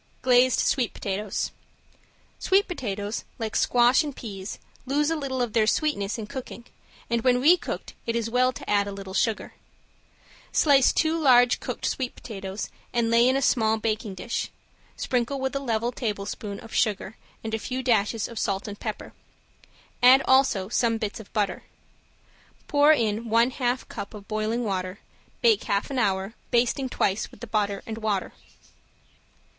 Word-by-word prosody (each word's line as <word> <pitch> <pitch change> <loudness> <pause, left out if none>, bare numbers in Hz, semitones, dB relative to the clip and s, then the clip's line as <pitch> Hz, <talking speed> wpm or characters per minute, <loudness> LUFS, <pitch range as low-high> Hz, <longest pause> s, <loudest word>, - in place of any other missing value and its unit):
~GLAZED 250 0 +4
SWEET 250 -4 0
POTATOES~ 200 0 -3 0.9
Sweet 390 +1 +3
potatoes, 210 - -4
like 220 -2 -4
squash 245 +4 +4
and 290 -3 -5
peas, 195 -3 -7 0.3
lose 295 +3 +1
a - - +1
little 265 -4 -2
of 230 -3 -4
their 220 -2 +3
sweetness 225 -9 0
in 220 - -5
cooking, 240 +1 -8 0.4
and 235 0 0
when 250 +1 +3
recooked 335 +7 +2
it 230 - 0
is 230 -1 0
well 250 +2 +2
to - - -10
add 200 -1 +2
a - - -4
little 195 -1 -8
sugar. 225 +1 0 1.0
Slice 275 -4 +5
two 315 0 +1
large 245 -4 +5
cooked - - -5
sweet 255 -2 -2
potatoes 195 -2 -6 0.2
and 235 -1 +1
lay 235 +2 +5
in 260 - +2
a 275 - +1
small 220 -3 +3
baking 215 -2 -2
dish, 235 +5 -3 0.5
sprinkle 255 +2 -1
with 265 0 -2
a - - +1
level 235 -3 -1
tablespoon 205 -3 -4
of 225 - -12
sugar 215 -2 0 0.3
and 220 0 -5
a 225 - 0
few 255 +3 -4
dashes 225 -3 +1
of 230 - -7
salt 195 +1 -1
and 205 0 -7
pepper, 215 -2 -6 0.9
add 255 +2 +7
also 260 -8 +3
some 230 +1 +1
bits 215 -2 -4
of 220 - -12
butter. 200 -4 -1 1.0
Pour 290 +1 +5
in 225 -5 +1
one 230 +3 +4
half 250 -1 -1
cup 200 0 -7
of 205 -1 -11
boiling 215 +2 -1
water, 185 -2 -3 0.5
bake 450 -3 +4
half 200 +6 -1
an 265 - -1
hour, 195 -1 0 0.2
basting 250 +2 +1
twice 200 -4 0
with - - -17
the 240 - -6
butter 205 -3 -1
and 220 0 -6
water. 210 -4 -1
230 Hz, 165 wpm, -26 LUFS, 210-255 Hz, 1.0 s, add